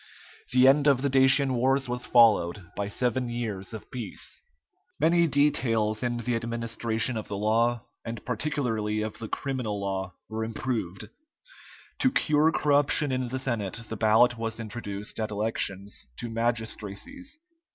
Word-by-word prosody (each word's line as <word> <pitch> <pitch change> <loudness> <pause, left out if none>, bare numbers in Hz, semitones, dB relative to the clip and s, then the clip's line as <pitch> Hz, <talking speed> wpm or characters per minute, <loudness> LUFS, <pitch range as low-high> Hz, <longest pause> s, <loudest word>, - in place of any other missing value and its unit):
The 130 +1 +6
end 145 +2 +5
of 135 -2 +4
the 140 - +2
Dacian 135 0 +4
wars 135 +2 +2
was 125 0 -3
followed 105 -6 +4
by 100 0 -2
seven 125 +3 -1
years 110 -5 -3
of 110 - -9
peace. 120 -5 -5 0.6
Many 170 +2 +4
details 115 -7 +2
in 120 -1 -1
the 120 0 -1
administration 115 0 -2
of 110 - -5
the 100 - -4
law, 115 +3 +1 0.2
and 115 -1 -6
particularly 115 -5 -1
of 110 -1 -5
the 115 - -5
criminal 125 -6 -3
law, 95 -1 -3
were 110 0 -3
improved. 110 -5 -3 0.9
To 260 - +3
cure 155 -4 +3
corruption 145 -1 +3
in 130 -1 -1
the 130 +2 -3
Senate 115 -6 -2
the 115 - -3
ballot 115 +2 +4
was 115 0 -3
introduced 105 -2 -6
at 110 0 -1
elections 105 -2 -2
to 120 - -5
magistracies. 115 - -3
115 Hz, 145 wpm, -27 LUFS, 110-130 Hz, 0.9 s, The